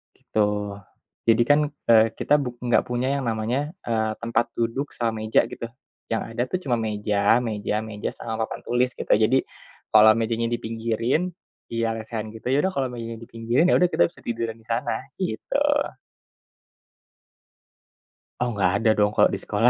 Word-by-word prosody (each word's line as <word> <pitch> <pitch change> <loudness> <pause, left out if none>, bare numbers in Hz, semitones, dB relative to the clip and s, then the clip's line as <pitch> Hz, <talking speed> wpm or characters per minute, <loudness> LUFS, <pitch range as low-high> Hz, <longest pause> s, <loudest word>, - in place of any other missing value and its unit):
Gitu, 105 -1 0 0.8
jadi 115 +1 +5
kan 145 - +6 0.3
e 115 - +8 0.2
kita - - 0
bu 140 -4 -2 0.2
gak 120 - +4
punya 125 +1 -1
yang 140 - -3
namanya 120 +8 -1
eee 110 -2 0
tempat 115 0 +1
duduk 120 +5 -2
sama 115 -2 -2
meja 110 - +4
gitu. - - -6 0.5
Yang 115 - +1
ada 120 - 0
tuh 185 - 0
cuma 125 -4 +1
meja, 105 +1 +2
meja, 105 -2 -2
meja 110 -1 -4
sama 110 -1 -3
papan - - -8
tulis 125 +1 +1
gitu. - - -7
Jadi, 115 +5 +4 0.5
kalau 110 0 +9
mejanya 115 0 0
dipinggirin 115 +9 -1 0.4
iya 115 0 0
lesehan 110 -1 -5
gitu, 110 - -12
yaudah 145 +7 +3
kalau 135 -1 +1
meja 115 -1 -6
dipinggirin 115 +5 0
yaudah 180 - +4
kita 85 - +3
bisa - - -8
tiduran 115 -1 -3
disana, 120 +3 -3
gitu. 180 - -2 2.8
Oh 125 - +1
gak 90 -1 +4
ada 110 - +3
dong 105 0 +3
kalau - - +5
di - - 0
sekolah. 115 +4 +3
115 Hz, 155 wpm, -24 LUFS, 110-125 Hz, 2.8 s, kalau